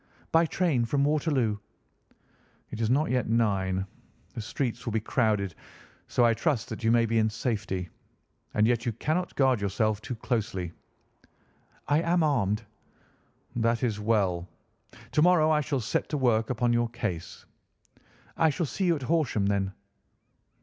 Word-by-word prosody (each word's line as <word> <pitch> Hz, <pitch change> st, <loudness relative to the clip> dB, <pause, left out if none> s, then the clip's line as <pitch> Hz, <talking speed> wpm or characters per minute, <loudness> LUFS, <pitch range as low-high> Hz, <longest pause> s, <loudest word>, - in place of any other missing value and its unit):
"By 165 Hz, 0 st, +4 dB
train 160 Hz, -8 st, +1 dB
from 140 Hz, +4 st, +1 dB
Waterloo." 140 Hz, -8 st, +1 dB, 1.1 s
"It 115 Hz, -, -5 dB
is 110 Hz, -, +1 dB
not 140 Hz, +4 st, +2 dB
yet 125 Hz, -3 st, 0 dB
nine. 95 Hz, -5 st, +1 dB, 0.5 s
The -, -, -5 dB
streets 120 Hz, +2 st, -3 dB
will 115 Hz, -, -3 dB
be 110 Hz, -, +2 dB
crowded, 105 Hz, -4 st, 0 dB, 0.5 s
so 120 Hz, -, +3 dB
I 115 Hz, -, +4 dB
trust 130 Hz, -1 st, -1 dB
that 110 Hz, +1 st, -6 dB
you 115 Hz, -, +3 dB
may 115 Hz, 0 st, +4 dB
be 115 Hz, 0 st, +1 dB
in 110 Hz, 0 st, +3 dB
safety. 105 Hz, -5 st, -2 dB, 0.7 s
And 105 Hz, -, +4 dB
yet 115 Hz, 0 st, +2 dB
you 120 Hz, -, -1 dB
cannot 160 Hz, -, -2 dB
guard 130 Hz, -5 st, +3 dB
yourself 105 Hz, +1 st, 0 dB
too 125 Hz, +2 st, -5 dB
closely." 105 Hz, -7 st, -2 dB, 1.2 s
"I 145 Hz, +2 st, +3 dB
am 170 Hz, 0 st, +2 dB
armed." 115 Hz, -8 st, +1 dB, 0.9 s
"That 115 Hz, +1 st, +1 dB
is 110 Hz, -4 st, 0 dB
well. 100 Hz, -5 st, +1 dB, 0.6 s
To 150 Hz, -, +2 dB
morrow 165 Hz, -2 st, +5 dB
I 150 Hz, -1 st, +3 dB
shall 145 Hz, -2 st, -1 dB
set 115 Hz, -, -1 dB
to 150 Hz, -, -1 dB
work 115 Hz, -4 st, +2 dB
upon 120 Hz, -1 st, +1 dB
your 120 Hz, 0 st, +1 dB
case." 110 Hz, -8 st, -5 dB, 0.9 s
"I 160 Hz, -, +4 dB
shall 160 Hz, +3 st, -1 dB
see 190 Hz, +7 st, -2 dB
you 170 Hz, -2 st, +3 dB
at 140 Hz, -, -6 dB
Horsham, 140 Hz, -9 st, +1 dB
then?" 100 Hz, -1 st, 0 dB
115 Hz, 155 wpm, -28 LUFS, 105-145 Hz, 1.2 s, morrow